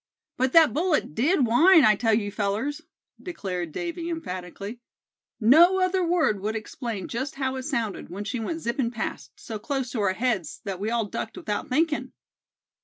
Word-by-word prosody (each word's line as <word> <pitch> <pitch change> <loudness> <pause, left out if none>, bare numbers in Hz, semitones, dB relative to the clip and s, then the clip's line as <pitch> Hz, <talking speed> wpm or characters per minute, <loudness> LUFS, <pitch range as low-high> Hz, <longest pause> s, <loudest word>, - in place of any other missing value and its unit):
"But 260 +1 0
that 325 -2 +7
bullet 320 - 0
did 275 - +2
whine, 320 +8 +6
I 215 - +6
tell 225 +1 +2
you, 205 -2 -1
fellers;" 220 +10 -2 0.4
declared 185 - -4
Davy, 340 - -4
emphatically; 200 - -6 0.6
"no 330 - +6
other 370 0 +2
word 330 - +2
would 215 +3 -3
explain 220 -2 -5
just 265 +6 -4
how 265 -1 -2
it - - -3
sounded, 235 -8 -3
when 195 +4 -5
she 240 +3 -3
went 325 +9 -4
zipping 235 -1 -1
past, 145 - -5
so 220 -2 -7
close 265 0 -3
to 230 - -2
our 190 -2 +2
heads 195 - -1
that 195 -3 -4
we 210 +3 -2
all 230 -1 0
ducked 215 +2 -5
without 210 -1 -3
thinkin'." 310 +3 0
235 Hz, 175 wpm, -25 LUFS, 205-310 Hz, 0.6 s, that